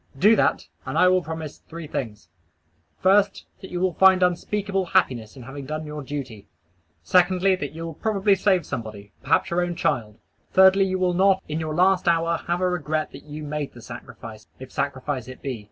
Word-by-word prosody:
Do 210 +10 +6
that, - - +1 0.2
and - - -4
I 180 - +6
will 185 0 +3
promise 160 -2 -7
three 165 0 -7
things: 110 - -5 0.7
First, 200 +1 +3 0.2
That 190 - -9
you 175 - -4
will 185 -1 +1
find 190 0 +5
unspeakable 195 +2 0
happiness 120 -8 0
in 130 - -10
having 135 +2 -8
done 155 +1 -4
your 150 0 -6
duty; 130 -7 -7 0.6
secondly, 185 +1 +3
you 165 +3 -7
will 165 - -6
probably 200 +3 +1
save 190 -3 +2
somebody, 105 -3 -7
perhaps 190 - +1
your 175 +1 +1
own 175 -1 -2
child; 110 - -1 0.4
thirdly, 190 +1 +6
you 185 0 -1
will 180 -1 +1
not, 190 +1 +3
in 155 +1 -3
your 155 -1 -3
last 185 +1 +3
hour, 165 0 +2
have 175 +1 0
a 185 - +2
regret 155 -3 -2
that - - -12
you 150 +1 -8
made 150 -1 -4
the 120 - -12
sacrifice, 115 -2 -10
if 130 0 -11
sacrifice 130 -2 -3
it 130 - -11
be. 130 -4 -4
165 Hz, 190 wpm, -24 LUFS, 135-185 Hz, 0.7 s, Do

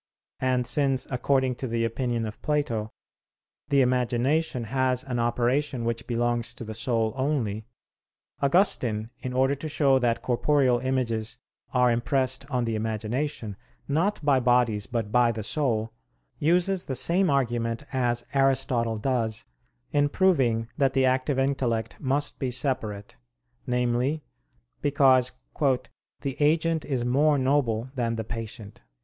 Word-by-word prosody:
And 130 -1 +1
since, 135 0 +1
according 130 0 +1
to 130 - -4
the 115 0 0
opinion 120 0 -1
of 105 -1 -7
Plato, 120 -8 -1 0.8
the 140 -1 +4
imagination 125 +3 +1
has 130 +2 0
an 125 -3 -3
operation 120 +2 0
which 115 0 -3
belongs 120 -1 -1
to - - -8
the 110 -1 -6
soul 115 -1 0
only, 120 -6 -1 0.7
Augustine, 125 - +2
in 130 - -4
order 130 +2 +2
to 145 +3 -5
show 140 -3 +3
that 120 -2 0
corporeal 130 0 +2
images 120 -4 -2 0.3
are 125 -2 +3
impressed 130 +3 0
on 125 -3 0
the 115 - -1
imagination, 110 +1 -3 0.3
not 170 +9 +1
by 140 -3 +4
bodies 120 -4 +2
but 115 -4 -3
by 120 0 +4
the 110 -1 -5
soul, 115 -3 -1 0.5
uses 175 +4 +2
the 130 - -3
same 180 +7 +2
argument 120 -4 0
as 120 -2 0
Aristotle 135 -4 +1
does 115 -2 -1 0.5
in 145 0 +2
proving 135 -11 +2
that 135 -3 +2
the 135 -1 +3
active 130 +1 +1
intellect 130 -5 0
must 140 +1 -1
be 130 - -1
separate, 120 -6 -3 0.5
namely, 125 +5 0 0.6
because 135 -3 +4 0.9
"the 135 -2 -4
agent 160 +1 +2
is 130 -4 -1
more 145 +4 +3
noble 130 -3 +1
than 120 -3 -1
the 110 - -3
patient." 115 -1 -7
125 Hz, 135 wpm, -26 LUFS, 115-140 Hz, 0.9 s, the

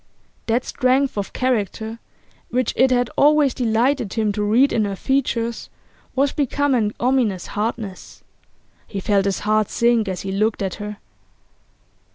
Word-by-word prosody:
That 235 +2 +1
strength 265 +1 +1
of 205 -2 -3
character 225 -2 -2 0.5
which 250 -1 0
it 260 - +4
had 245 -2 +1
always 295 -2 +4
delighted 240 -1 0
him 215 -2 0
to 210 +1 -3
read 230 +7 +3
in 220 - +2
her 200 -1 -3
features 235 -1 -1 0.5
was 275 +1 +2
become 285 0 0
an 215 -4 +1
ominous 240 -7 +1
hardness. 210 -2 -5 0.6
He 200 - -5
felt 195 0 +1
his 195 -1 -1
heart 215 0 +1
sink 235 -2 +2
as 185 -1 -3
he 195 - -4
looked 210 +1 0
at 190 - -2
her. 210 0 -6
230 Hz, 150 wpm, -21 LUFS, 210-255 Hz, 0.6 s, it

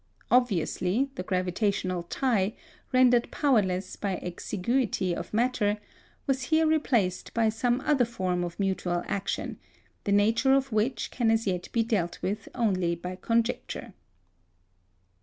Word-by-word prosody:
Obviously, 240 - +2
the 265 - -5
gravitational 185 0 -1
tie, 220 -6 +1 0.4
rendered 250 -2 +4
powerless 195 -10 +1
by 195 -2 -2
exiguity 185 +1 -1
of - - -6
matter, 220 -2 +1 0.5
was 265 -2 0
here 320 0 +4
replaced 245 - +1
by 225 -1 +3
some 240 +3 +1
other 290 -4 +3
form 185 -7 -1
of 175 +1 -6
mutual 185 -3 0
action, 200 0 -3 0.5
the 200 - 0
nature 225 +6 +4
of 270 -1 0
which 220 +4 0
can 235 -3 +1
as 225 0 +2
yet 180 -3 -2
be 230 - +2
dealt 200 -7 -1
with 200 +3 -3
only 185 -8 +1
by 180 +2 -6
conjecture. 230 +1 -1
215 Hz, 130 wpm, -28 LUFS, 185-245 Hz, 0.5 s, rendered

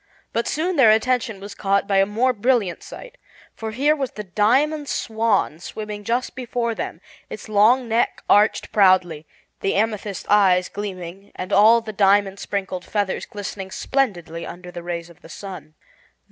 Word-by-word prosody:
But 230 - -1
soon 340 +3 -1
their 250 -5 +7
attention 225 -1 +1
was 200 +1 -8
caught 200 0 0
by 200 -2 +2
a 195 0 +4
more 240 +5 +1
brilliant 225 -5 0
sight, - - -11 0.3
for 225 - -6
here 280 +7 +2
was 270 -4 -2
the 210 - -7
Diamond 270 - +1
Swan 220 -8 0
swimming 210 +3 -7
just 240 +4 -1
before 240 -2 -2
them, - - -5 0.3
its - - -8
long 220 +4 +4
neck 230 +1 0
arched 210 +1 +3
proudly, 185 -6 +3 0.3
the 195 - -1
amethyst 210 -2 -1
eyes 185 -3 +4
gleaming 195 -1 -7
and 185 +2 -5
all 220 +3 +6
the 220 -1 -7
diamond 200 -1 +3
sprinkled 190 -2 -4
feathers 205 -2 -2
glistening 200 -2 -6
splendidly 180 -10 -2
under 180 +1 -9
the 175 -1 -7
rays 170 0 -5
of 170 - -21
the - - -14
sun. 180 -5 -9
205 Hz, 160 wpm, -22 LUFS, 190-230 Hz, 0.3 s, their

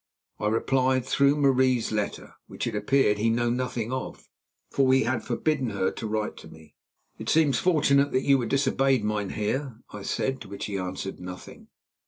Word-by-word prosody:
I 105 - -1
replied, 130 +3 +1
through 140 +1 +3
Marie's 130 -4 +2
letter, 105 -2 -3
which, - - -5
it - - -3
appeared, 105 0 +2
he 115 +2 +2
knew 120 +1 +1
nothing 125 -2 -2
of, 130 0 -5 0.4
for 135 -1 +3
he 130 0 +4
had 120 0 -1
forbidden 145 -6 -1
her 100 -3 0
to 110 - -6
write 110 0 -2
to - - -11
me. 80 -1 -16 0.5
"It - - -5
seems 150 -5 +3
fortunate 145 -5 +3
that 130 - +1
you 140 -1 +4
were 120 - -2
disobeyed, 135 -2 +2
mynheer," 105 +5 -2
I 105 - -8
said, 130 +6 -2
to - - -9
which 100 - -5
he 100 - -4
answered 95 +1 -4
nothing. 90 0 -10
125 Hz, 180 wpm, -26 LUFS, 105-135 Hz, 0.5 s, he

